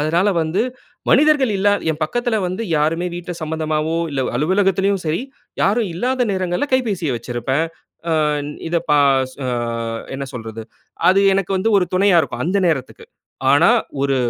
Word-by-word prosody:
அதனால 165 +6 +2
வந்து, 165 +7 0 0.5
மனிதர்கள் 290 -5 +4
இல்லாத 205 +1 +2
என் 155 0 -4
பக்கத்ல 240 +5 -1
வந்து 185 +5 -3
யாருமே 160 +4 +1
வீட்ல 175 0 -6
சம்பந்தமாவோ, 155 0 -1
இல்ல 135 -2 -1
அலுவலகத்திலும் 195 +4 +1
சரி, 160 +10 0 0.4
யாரும் 210 +1 +2
இல்லாத 250 +6 0
நேரங்கள்ல 185 +8 -1
கைபேசிய 195 - 0
வச்சிருப்பேன். 120 +5 -2 0.5
ஆ - - +2 0.6
இத 170 - 0
ப - - +5 0.4
சு - - -17
அ - - -1 0.6
என்ன 140 +1 -4
சொல்றது? 115 -1 -6 0.5
அது 195 +2 +5
எனக்கு 195 -1 -1
வந்து 225 - +1
ஒரு 180 - +2
துணையா 190 -2 +4
இருக்கும் 125 -2 -4
அந்த 190 +4 +1
நேரத்துக்கு. 135 -5 -3 0.5
ஆனா - - +5 0.3
ஒரு 140 -1 +1
175 Hz, 145 wpm, -19 LUFS, 155-200 Hz, 0.6 s, ப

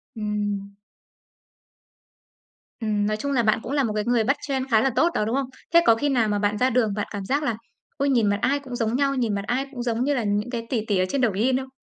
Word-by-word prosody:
Ừm. 205 -2 -3 2.1
Ừm, 210 -2 0
nói 215 0 -1
chung 280 +6 -3
là 250 -4 +2
bạn 215 -1 +2
cũng - - -6
là 285 -1 +2
một 220 -4 -1
cái 210 0 -1
người 240 -2 +2 0.2
trend 265 -2 -2
khá 220 -1 +5
là 270 - +2
tốt 335 - +4
đó, 210 - 0
đúng 225 +4 -1
không? 270 -1 -1 0.2
Thế 340 - +8
có 230 - +6
khi 290 +6 0
nào 240 -5 +2
mà 205 0 0
bạn 205 0 0
ra 255 +4 +2
đường, 230 -4 +1
bạn 205 - -2
cảm 200 -2 -5
giác 285 +7 0
là 235 -7 -1 0.4
ôi, 280 0 +1
nhìn 235 -6 +3
mặt 205 0 +1
ai 280 +1 +2
cũng 265 -3 -8
giống 230 -1 -1
nhau, 275 +1 +1
nhìn 235 -5 0
mặt 200 - -2
ai 260 +3 0
cũng 245 -4 -5
giống 235 0 0
như 290 +2 +1
là 250 -4 -1
những 205 +3 -1
cái 235 -2 -4
tỷ 225 -4 -1
tỷ 205 - +1
ở 185 - +2
trên 275 - 0
Douyin 240 +3 +2
không? 265 0 -5
235 Hz, 265 wpm, -24 LUFS, 210-265 Hz, 2.1 s, Thế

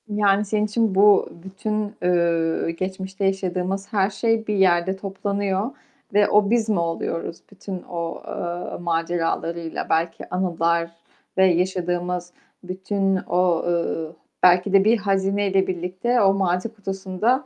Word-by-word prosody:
Yani, 205 -1 +2
senin 210 +1 0
için 215 -1 0
bu 200 0 +5
bütün, 210 +2 -3
ııı, 170 -2 +1
geçmişte 190 +3 -4
yaşadığımız 190 +1 -2
her 195 -1 +3
şey, 220 +2 0
bir 210 - 0
yerde 185 -1 +3
toplanıyor 200 +2 -2 0.4
ve 205 0 +4
o 205 -1 +4
biz 230 -1 +2
mi 205 -5 +2
oluyoruz 165 0 -3
bütün 190 -2 -7
o, 170 -1 -4
eee, 175 0 -4
maceralarıyla, 165 0 -2
belki 165 +1 -1
anılar 170 -2 0 0.5
ve 190 - +6
yaşadığımız 180 0 0 0.3
bütün 195 +1 -1
o, 180 -2 +2
ııı, 170 -2 -1 0.3
belki 180 +2 +5
de 195 -1 +6
bir 225 +2 +5
hazineyle 195 -1 +1
birlikte 185 +7 0
o 195 -1 +5
martı 190 +3 0
kutusunda 195 +5 -1
190 Hz, 125 wpm, -23 LUFS, 175-200 Hz, 0.5 s, ve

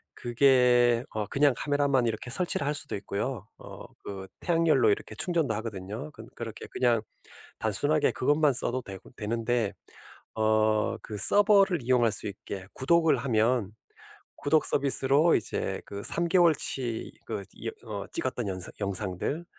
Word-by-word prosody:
그게 125 -1 +3
어 105 -1 -4
그냥 140 +4 +2
카메라만 145 -3 +1
이렇게 115 +2 -4
설치를 160 +1 0
할 145 - 0
수도 140 -1 +2
있고요. 105 +2 -4
어 - - -11 0.2
그 95 -1 -7
태양열로 165 - +2
이렇게 410 - -3
충전도 165 -9 0
하거든요. 110 +5 -6
그 115 -7 -13
그렇게 115 -2 -8
그냥 120 -3 +1 0.6
단순하게 145 +8 +2
그것만 145 +2 +2
써도 125 +1 0
되고 95 -4 -11
되는데 115 0 -1 0.6
어 110 0 +1
그 105 - -7
서버를 200 - +5
이용할 120 -1 +2
수 - - +3
있게 100 -1 -8
구독을 160 +1 +2
하면 120 -3 0 0.7
구독 155 +2 +1
서비스로 140 +3 +3
이제 110 - -3
그 100 0 -8
3 170 0 +1
개월치 155 -9 +1
그 - - -5 0.2
여 - - -2 0.2
어 - - -5
찍었던 125 - -3
여 95 - -4 0.2
영상들 100 - -2
125 Hz, 290 characters per minute, -27 LUFS, 110-145 Hz, 0.7 s, 서버를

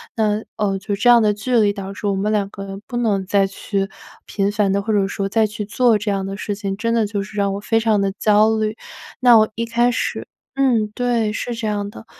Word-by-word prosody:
那， 215 -1 0
呃， 195 -2 0
就 200 +2 -4
这 245 +4 +2
样 240 -1 +8
的 210 -1 +3
距 240 +4 -1
离 205 -2 +3
导 195 -1 -6
致 205 - -8
我 200 - +1
们 205 +3 -1
两 205 -2 +1
个 195 - -8
人 195 0 -7
不 240 - -5
能 205 -5 0
再 195 0 +2
去 195 0 -3 0.4
频 200 0 0
繁 205 -2 +1
地 200 - +1
或 220 - -1
者 195 -1 +2
说 195 0 -3
再 220 +1 +2
去 210 0 -6
做 230 +1 +3
这 210 0 -2
样 195 -1 -1
的 195 +1 -5
事 205 - -3
情， 200 -1 -4
真 230 +1 -1
的 225 -3 +2
就 200 -1 -3
是 210 +1 -12
让 200 -1 +1
我 - - -4
非 225 +2 +1
常 220 -2 +2
地 195 -1 0
焦 215 +1 +4
虑。 215 +1 -2 0.4
那 240 -2 +7
我 215 0 +4
一 230 +1 -2
开 240 +1 +2
始 - - -3 0.3
嗯， 240 -6 +2
对， 235 -3 0
是 240 +1 -3
这 225 -1 -3
样 205 -1 -2
的。 225 - -12
210 Hz, 270 characters per minute, -20 LUFS, 200-225 Hz, 0.4 s, 样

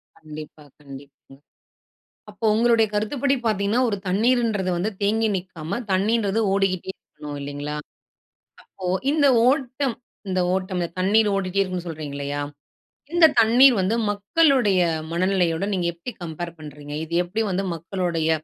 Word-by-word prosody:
கண்டிப்பா. 155 -1 -11 0.2
கண்டிப்பாங்க. 140 -1 -14 0.9
அப்போ 210 +2 -10
உங்களுடைய 230 0 +4
கருத்துப்படி 270 +6 0
பார்த்தீங்கன்னா, 210 +3 +1
ஒரு 200 - -1
தண்ணீருன்றது 220 -2 +1
வந்து 195 +6 -1
தேங்கி 220 +2 +2
நிக்காம, 180 +1 -5
தண்ணீன்றது 210 +2 +1
ஓடிக்கிட்டே 190 -2 0
இருக்கணும், 150 -1 -10
இல்லைங்களா? 145 +1 -5 0.9
அப்போ 185 - -9 0.3
இந்த 295 -2 +3 0.2
ஓட்டம் 265 -2 0 0.3
இந்த 185 0 +1
ஓட்டம்ல 185 -2 -2
தண்ணீர் 210 +3 +3
ஓடிட்டே 195 0 -2
இருக்கனும்னு 185 -2 -2
சொல்றீங்க, 150 -3 -6
இல்லையா. 145 +1 -3 0.7
இந்த 345 -2 +7
தண்ணீர் 245 +3 +6
வந்து, 200 +5 +1 0.2
மக்களுடைய 210 - +2 0.3
மனநிலையோட, 180 0 +1
நீங்க 175 -2 0
எப்டி 170 +9 -7
கம்பேர் 170 +1 -6
பண்றீங்க? 145 -1 -9
இது 165 - -10
எப்டி 215 +6 -2
வந்து 195 +2 -1
மக்களுடைய 170 -1 -2
190 Hz, 125 wpm, -23 LUFS, 165-225 Hz, 0.9 s, இந்த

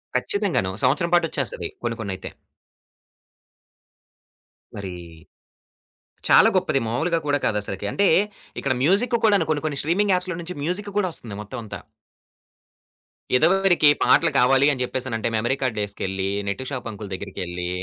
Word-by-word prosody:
ఖచ్చితంగాను. 160 - 0
సంవత్సరం 170 +7 +2
పాటొచ్చేస్తది 140 - -1 0.2
కొన్ని, 115 -1 -2
కొన్నయితే. 95 -3 -5 2.5
మరి. 95 -3 -6 1.4
చాలా - - +7
గొప్పది - - +1
మాములుగా 160 +9 0
కూడా 145 0 +2
కాదసలకి. 105 -1 -2
అంటే, 200 -1 +3 0.5
ఇక్కడ 140 - 0
మ్యూజిక్ 210 - +3
కూడా 210 -2 +5
కొన్ని, 150 -1 -1
కొన్ని 145 -3 -3
స్ట్రీమింగ్ 190 +6 +1
యాప్స్‌లో 180 -1 -2
నుంచి 180 +2 -7
మ్యూజిక్ 185 +6 -2
కూడా 185 -3 +1
ఒస్తుంది 110 -8 -6
మొత్తం 105 - -8
అంతా. 105 - -7 1.6
ఇదవరికి 175 +2 +4
పాటలు 160 +2 +5
కావాలి 135 +2 +4
అని 130 - -3
జెప్పేసనంటే 125 -3 -3
మెమరీ 120 +4 +1
కార్డ్ 125 -4 -1
ఏసుకెళ్ళి, 95 -1 -3 0.2
నెట్టు 115 +7 -3
షాపంకుల్ 110 -6 -6
దగ్గరికెళ్లి, 90 -2 -5
130 Hz, 120 wpm, -23 LUFS, 105-170 Hz, 2.5 s, చాలా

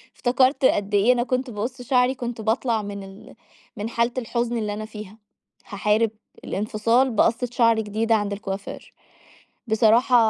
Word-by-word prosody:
افتكرت 260 +2 +2
قد 205 -4 +1
إيه 205 +5 +5
أنا 240 -1 0
كنت 255 0 -2
باقص 240 +4 -5
شعري، 250 +1 +2
كنت 240 -2 -5
باطلع 225 +1 0
مِن 200 -1 -7
ال 195 +1 -13 0.4
مِن 210 +2 -4
حالة 235 +1 0
الحزن 240 -1 -1
اللي 210 -2 -2
أنا 215 +1 -5
فيها. 215 -1 -10 0.5
هاحارب 210 +2 +1 0.3
الانفصال 230 +5 +1
بقصة 230 +2 +1
شعر 230 -2 +3
جديدة 220 +1 0
عند 205 -1 -1
الكوافير. 195 -1 -7 0.8
بصراحة، 225 +3 +4
225 Hz, 145 wpm, -23 LUFS, 210-245 Hz, 0.8 s, إيه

